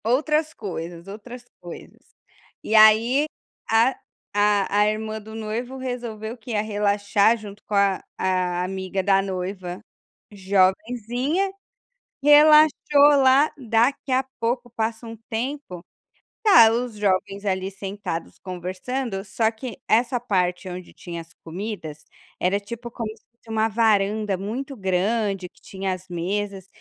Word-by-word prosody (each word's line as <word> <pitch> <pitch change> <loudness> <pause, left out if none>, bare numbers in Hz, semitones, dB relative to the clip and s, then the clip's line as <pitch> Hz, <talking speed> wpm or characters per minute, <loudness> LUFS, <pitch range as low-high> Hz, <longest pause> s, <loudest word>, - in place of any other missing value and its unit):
Outras 305 +6 +1
coisas, 170 -3 -7
outras 235 +5 -9 0.2
coisas 175 - -11 0.6
e 220 - -1
aí 225 +6 +6 0.4
a 230 +4 +3 0.4
a 205 -1 +2
a 210 - +5
irmã 215 0 -3
do 220 +1 -11
noivo 225 +4 -4
resolveu, 240 -3 -5
que 235 +1 -9
ia 210 -2 +1
relaxar 205 0 +2
junto 210 -2 -11
com - - -7
a 200 -1 +3 0.2
a 180 -1 0
amiga 190 +1 -3
da 195 0 +4
noiva 185 -1 -5 0.5
jovenzinha. 230 - 0 0.7
Relaxou 300 +1 +8 0.5
lá, 265 +3 +5
daqui 240 +3 +1
a 260 +1 +2 0.2
pouco 240 +1 -1
passa 225 0 -3
um 225 0 -8
tempo, 235 -6 -4 0.6
tá 235 - +8
os 240 0 -2
jovens 200 0 -1
ali 190 -1 -1
sentados 195 -3 -6
conversando, 195 +5 -4
só 220 +3 0
que 230 +1 -8
essa 240 +3 +2
parte 185 -5 -1
onde 180 0 -8
tinha 170 -1 -7
as 165 0 -17
comidas 165 -4 -6 0.3
era 190 +3 +1
tipo 235 +3 -8
como 230 -2 -4
se - - -27
fosse 235 -1 -23
uma 220 0 +1
varanda 210 -2 +1
muito 245 +9 -5
grande, 195 0 0
que - - -27
tinha 190 -1 -4
as 185 0 -9
mesas 195 +2 -3
210 Hz, 130 wpm, -23 LUFS, 190-235 Hz, 0.7 s, Relaxou